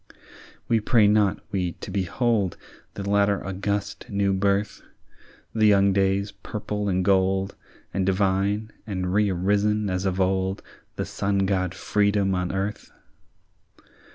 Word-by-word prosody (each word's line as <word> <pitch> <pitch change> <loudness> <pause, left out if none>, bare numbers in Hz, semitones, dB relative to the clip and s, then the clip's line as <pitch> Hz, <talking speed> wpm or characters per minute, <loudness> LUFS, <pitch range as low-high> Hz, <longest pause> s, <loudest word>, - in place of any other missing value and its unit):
"We 115 - +3
pray 110 0 +4
not, 105 -2 +3
we, 90 -4 -1
to - - -9
behold 100 +1 0 0.4
The 100 -1 -5
latter 100 0 +2
august 100 +4 -3
new 100 -2 +1
birth, 100 +2 0 0.7
The 110 -1 +3
young 100 -1 +4
day's 100 +1 +1
purple 105 0 -4
and 90 -1 0
gold, 95 0 +2 0.4
And 95 - 0
divine, 100 +3 +1 0.2
and 90 -3 -2
rerisen 105 +1 +1
as 90 +1 -1
of 95 0 -1
old, 95 0 0 0.3
The - - -2
sun 100 0 0
god 95 -1 0
Freedom 100 -1 +1
on 90 -1 -1
earth. 100 +2 -4
100 Hz, 125 wpm, -25 LUFS, 95-105 Hz, 0.7 s, pray